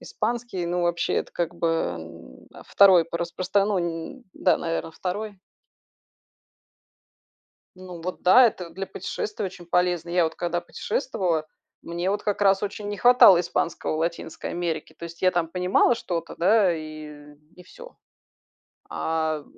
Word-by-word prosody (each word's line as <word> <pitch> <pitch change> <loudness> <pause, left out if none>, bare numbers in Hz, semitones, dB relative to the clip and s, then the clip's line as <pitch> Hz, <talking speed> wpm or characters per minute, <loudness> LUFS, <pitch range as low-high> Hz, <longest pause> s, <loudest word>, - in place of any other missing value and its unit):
Испанский, 235 -4 -3
ну 175 +1 -1
вообще- 175 0 0
это - - -2
как-бы, 170 0 -2
м, 85 - -5 0.2
2 190 -4 +6
по 170 +1 -5
распростра 185 +3 0
ну. 175 +4 -3
Да, 180 - +2
наверно, 165 -1 -3
2. 200 +3 -5 2.4
Ну, 180 -2 -10
вот, 180 +2 -6
да. 240 +8 +7
Это 180 -6 -4
для 195 +2 -6
путешествий 210 +2 -5
очень 175 -2 -10
полезно. 180 -1 0
Я 175 0 +2
вот 160 - -2
когда 175 0 -2
путешествовала, 180 - -2 0.4
мне 175 +3 -2
вот 205 - -2
как 205 -1 -2
раз 195 -1 +3
очень 205 0 -4
не 205 - -4
хватало 245 -5 +7
испанского 170 -2 -2
в - - -3
Латинской 165 -1 -4
Америке. 165 -3 -4
То 170 - -7
есть 170 0 -10
я 185 - +5
там 175 -2 0
понимала 180 +7 +2
что-то, 170 -7 -4
да, 190 0 +3
и 150 -2 -9 0.2
и 180 - -14
всё. - - -14 0.9
А 160 -2 -2
175 Hz, 145 wpm, -25 LUFS, 165-195 Hz, 2.4 s, да